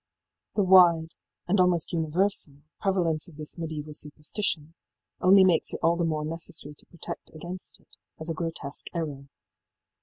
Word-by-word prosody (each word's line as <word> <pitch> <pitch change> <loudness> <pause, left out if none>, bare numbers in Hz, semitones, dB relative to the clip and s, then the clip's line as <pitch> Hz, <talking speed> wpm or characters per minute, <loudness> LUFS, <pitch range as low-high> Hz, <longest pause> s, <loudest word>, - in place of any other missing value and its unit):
The 205 - +3
wide, 175 -3 +6 0.3
and 190 +3 +2
almost 180 -2 +3
universal, 160 -3 0 0.2
prevalence 175 -5 +1
of 160 -4 -15
this 155 +2 -7
mediaeval 155 -2 -5
superstition 150 +2 -2 0.5
only 190 +1 +7
makes 180 -4 +2
it - - -5
all 165 +1 +4
the 170 - 0
more 155 -2 0
necessary 155 -2 -4
to - - -14
protest 170 - -7
against 175 +3 -6
it - - -8 0.2
as 160 - -5
a 165 - -1
grotesque 160 -3 -4
error.... 145 -5 -4
165 Hz, 150 wpm, -27 LUFS, 155-180 Hz, 0.5 s, only